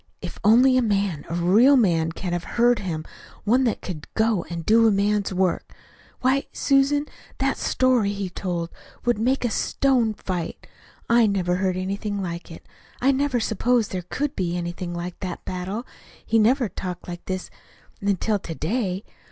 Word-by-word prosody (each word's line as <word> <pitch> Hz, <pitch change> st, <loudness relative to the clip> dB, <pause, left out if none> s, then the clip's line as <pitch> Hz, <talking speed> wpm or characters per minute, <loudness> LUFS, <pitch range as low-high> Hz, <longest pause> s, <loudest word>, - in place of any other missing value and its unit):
"If 175 Hz, -, -7 dB
only 250 Hz, +5 st, +6 dB
a -, -, +4 dB
man 200 Hz, -8 st, 0 dB
a 165 Hz, -, -2 dB
real 210 Hz, +11 st, +5 dB
man 165 Hz, -8 st, +2 dB
could 175 Hz, +1 st, -4 dB
have 175 Hz, 0 st, -2 dB
heard 240 Hz, 0 st, +4 dB
him 160 Hz, -5 st, -4 dB, 0.4 s
one 250 Hz, +5 st, +3 dB
that 230 Hz, -, -1 dB
could 160 Hz, -5 st, -7 dB
go 220 Hz, -5 st, +2 dB
and 170 Hz, -2 st, -5 dB
do 225 Hz, +1 st, +5 dB
a -, -, +4 dB
man's 200 Hz, 0 st, +1 dB
work! 185 Hz, -1 st, -1 dB, 0.5 s
Why, 265 Hz, +2 st, +2 dB
Susan, 280 Hz, +1 st, +2 dB, 0.3 s
that 270 Hz, 0 st, +1 dB
story, 255 Hz, -5 st, +2 dB
as -, -, -7 dB
he 200 Hz, -1 st, -2 dB
told 175 Hz, -3 st, -3 dB
it, -, -, -21 dB, 0.3 s
would 240 Hz, -3 st, +2 dB
make 250 Hz, +3 st, +1 dB
a 235 Hz, -, 0 dB
stone 245 Hz, -5 st, +1 dB
fight. 180 Hz, -5 st, -4 dB, 0.4 s
I 235 Hz, -1 st, +5 dB
never 180 Hz, -3 st, 0 dB
heard 185 Hz, -1 st, 0 dB
anything 200 Hz, +2 st, -3 dB
like 170 Hz, -2 st, -5 dB
it. 165 Hz, -, -12 dB, 0.3 s
I 265 Hz, +2 st, +4 dB
never 275 Hz, -2 st, +1 dB
supposed 225 Hz, +1 st, +1 dB
there 185 Hz, -, -2 dB
could 280 Hz, +11 st, -3 dB
be 175 Hz, -2 st, -1 dB
anything 175 Hz, 0 st, -4 dB
like 175 Hz, +1 st, -5 dB
that 180 Hz, -2 st, -6 dB
battle. 190 Hz, +6 st, -4 dB, 0.4 s
He 225 Hz, -, +3 dB
never 245 Hz, +3 st, +3 dB
talked 180 Hz, -1 st, -6 dB
like 175 Hz, -1 st, -7 dB
this, 185 Hz, -1 st, -4 dB, 0.5 s
until 200 Hz, +1 st, +1 dB
to 165 Hz, -3 st, -7 dB
day. 195 Hz, +2 st, -2 dB
200 Hz, 175 wpm, -24 LUFS, 180-240 Hz, 0.5 s, only